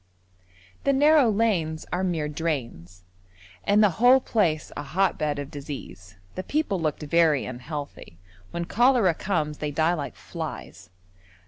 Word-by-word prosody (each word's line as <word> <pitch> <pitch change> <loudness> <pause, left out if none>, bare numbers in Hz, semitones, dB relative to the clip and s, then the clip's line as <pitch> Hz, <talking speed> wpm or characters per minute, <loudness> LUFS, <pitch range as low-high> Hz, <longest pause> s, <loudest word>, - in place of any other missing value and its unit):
The 275 - +3
narrow 290 -2 +5
lanes 195 -8 0
are 180 +1 0
mere 165 -5 -1
drains, 125 - -4 0.6
and 210 +1 +4
the 205 - +4
whole 250 +2 +7
place 175 - 0
a - - -4
hotbed 150 -1 0
of 145 0 -6
disease; 95 - -9 0.2
the - - -4
people 210 - -1
looked 155 -1 -2
very 155 -2 +3
unhealthy: 130 - -7 0.3
when 170 0 -4
cholera 235 -3 +3
comes 150 -4 -2
they 150 - -2
die 160 +4 +1
like 150 -5 -4
flies. - - -8
160 Hz, 135 wpm, -25 LUFS, 145-200 Hz, 0.6 s, whole